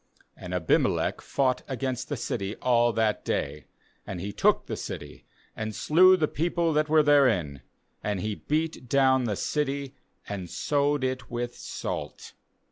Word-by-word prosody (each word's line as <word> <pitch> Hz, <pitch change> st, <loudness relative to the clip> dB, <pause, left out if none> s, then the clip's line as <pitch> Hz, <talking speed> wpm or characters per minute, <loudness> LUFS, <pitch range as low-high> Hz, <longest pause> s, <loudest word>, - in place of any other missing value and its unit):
45And 90 Hz, 0 st, -4 dB
Abimelech 85 Hz, -3 st, +1 dB
fought 130 Hz, -2 st, 0 dB
against 130 Hz, -1 st, -3 dB
the' 145 Hz, -, -2 dB
city 100 Hz, -3 st, -3 dB
all 120 Hz, -1 st, +3 dB
that 110 Hz, -2 st, 0 dB
day; 75 Hz, +2 st, -2 dB, 0.4 s
and 95 Hz, -, -5 dB
he 100 Hz, +3 st, -4 dB
took -, -, +2 dB
the -, -, -4 dB
city, -, -, -7 dB, 0.3 s
and 110 Hz, -1 st, -4 dB
slew 185 Hz, +4 st, +6 dB
the 155 Hz, -, +1 dB
people 170 Hz, +1 st, 0 dB
that 150 Hz, 0 st, +1 dB
were 155 Hz, 0 st, +5 dB
therein; 115 Hz, -, +3 dB, 0.4 s
and 105 Hz, -2 st, -1 dB
he 105 Hz, +4 st, -2 dB
beat 155 Hz, +1 st, -2 dB
down 130 Hz, -1 st, +4 dB
the 105 Hz, -3 st, -1 dB
city, 140 Hz, +2 st, -2 dB, 0.3 s
and 95 Hz, -4 st, -5 dB
sowed 145 Hz, -, 0 dB
it 130 Hz, -1 st, -2 dB
with 120 Hz, 0 st, -4 dB
salt. -, -, -6 dB
130 Hz, 150 wpm, -27 LUFS, 105-145 Hz, 0.4 s, slew